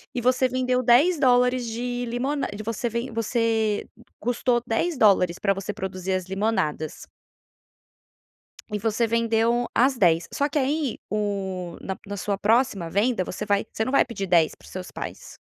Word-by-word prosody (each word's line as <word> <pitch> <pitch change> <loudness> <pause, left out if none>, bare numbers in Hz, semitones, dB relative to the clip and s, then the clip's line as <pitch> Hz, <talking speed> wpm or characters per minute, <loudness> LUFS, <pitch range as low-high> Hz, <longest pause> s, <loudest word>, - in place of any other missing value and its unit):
e 245 - -1
você 255 +2 +3
vendeu 255 0 0
$10 250 -2 +4
de 245 +2 -3
limona 265 +5 -1
de 215 - -6
você 230 +2 -2
ven 235 +3 -3
você 225 -2 0 0.3
custou 245 +1 +1
$10 220 - +2
pra 195 -1 +2
você 195 0 -4
produzir 190 0 -4
as 185 -1 -1
limonadas". 190 -6 -2 1.7
E 210 - -2
você 225 +2 +1
vendeu 230 +1 +1
as 260 +3 +4
10, 170 -5 +3
só 285 - +1
que 295 - -2
aí 280 -1 -1
o 195 -4 -3
na 190 - -4
na 205 0 -5
sua 200 +1 -2
próxima 210 -4 +1
venda 205 +3 +1
você 195 +3 -5
vai 205 -1 +1
você 220 - -1
não 260 - -2
vai 275 - +4
pedir 230 -6 -5
10 170 -3 +4
para - - -19
os - - -14
seus 185 0 -7
pais - - -8
225 Hz, 160 wpm, -25 LUFS, 195-250 Hz, 1.7 s, $10